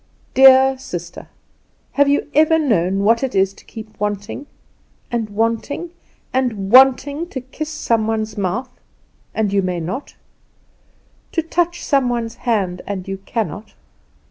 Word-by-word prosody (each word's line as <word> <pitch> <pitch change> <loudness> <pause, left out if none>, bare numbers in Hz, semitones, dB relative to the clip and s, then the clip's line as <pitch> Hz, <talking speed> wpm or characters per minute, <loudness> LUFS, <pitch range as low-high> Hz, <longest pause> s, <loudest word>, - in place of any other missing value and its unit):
"Dear 265 0 +7
sister, 175 -8 -7 0.6
have 285 0 +3
you 285 - +2
ever 315 +2 +4
known 195 - +1
what 230 +3 +3
it 265 -5 -2
is 190 0 +2
to - - -18
keep 220 -1 -11
wanting 210 +7 -4 0.6
and 230 -3 -2
wanting 230 +10 -2 0.4
and 225 -7 -1
wanting 270 +5 +5
to 265 - -4
kiss 265 +4 -7
some 230 -8 0
one's 220 -1 -2
mouth, 210 +6 -2 0.6
and 210 -3 0
you 200 - +3
may 180 -2 -2
not; 185 - -5 1.2
to 330 - 0
touch 345 +1 -1
some 275 -4 +2
one's 235 -2 -2 0.2
hand, 185 -5 0
and 195 -2 -4
you 195 0 -4
cannot? 210 -1 -4
230 Hz, 140 wpm, -19 LUFS, 200-270 Hz, 1.2 s, Dear